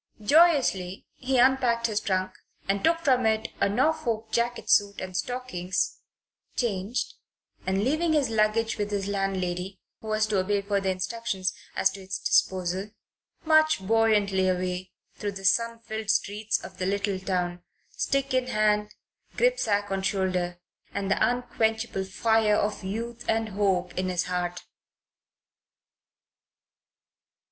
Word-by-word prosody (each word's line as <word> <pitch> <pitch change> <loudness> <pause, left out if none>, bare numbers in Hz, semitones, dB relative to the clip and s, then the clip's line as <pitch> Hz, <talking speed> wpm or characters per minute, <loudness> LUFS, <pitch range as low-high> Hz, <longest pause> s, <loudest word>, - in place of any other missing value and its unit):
Joyously 250 - +3
he 260 0 -1
unpacked 245 -2 +3
his 215 -3 +1
trunk 185 -2 -1 0.4
and 195 0 0
took 330 0 +3
from 255 -6 +3
it 220 0 0
a - - +3
Norfolk 235 -2 0
jacket 235 +1 -1
suit 200 -1 +3
and 185 -1 -6
stockings, 220 -6 -2 0.6
changed, 215 0 -1 0.5
and, 190 +1 +1
leaving 315 +6 +1
his 280 -6 +2
luggage 220 +1 +1
with 205 0 -1
his 200 -1 -2
landlady, 190 -1 -2 0.2
who 220 - -11
was 215 0 +2
to 215 -3 0
obey 200 +2 0
further 200 -1 0
instructions 190 +1 -2 0.2
as 190 - +3
to 195 - -9
its 190 0 -4
disposal, 185 +2 +1 0.6
marched 310 -10 +4
buoyantly 205 -3 +3
away 180 0 -2 0.3
through 205 -1 -3
the 195 0 -8
sun 230 +5 +2
filled 220 -2 -5
streets 215 +1 0
of - - -10
the 185 - -1
little 200 0 -1
town, 180 -2 -2 0.3
stick 275 -1 -1
in 255 -1 +1
hand, 210 -2 +1 0.4
gripsack 215 - +1
on 195 0 0
shoulder, 185 -2 -1 0.4
and 200 -1 -1
the - - +2
unquenchable 225 -4 -1
fire 220 +2 +2
of 210 -1 -1
youth 230 +4 -4
and 225 0 +1
hope 190 -3 0
in 185 0 -1
his 180 -1 0
heart. 180 -1 -3
205 Hz, 135 wpm, -27 LUFS, 190-230 Hz, 0.6 s, marched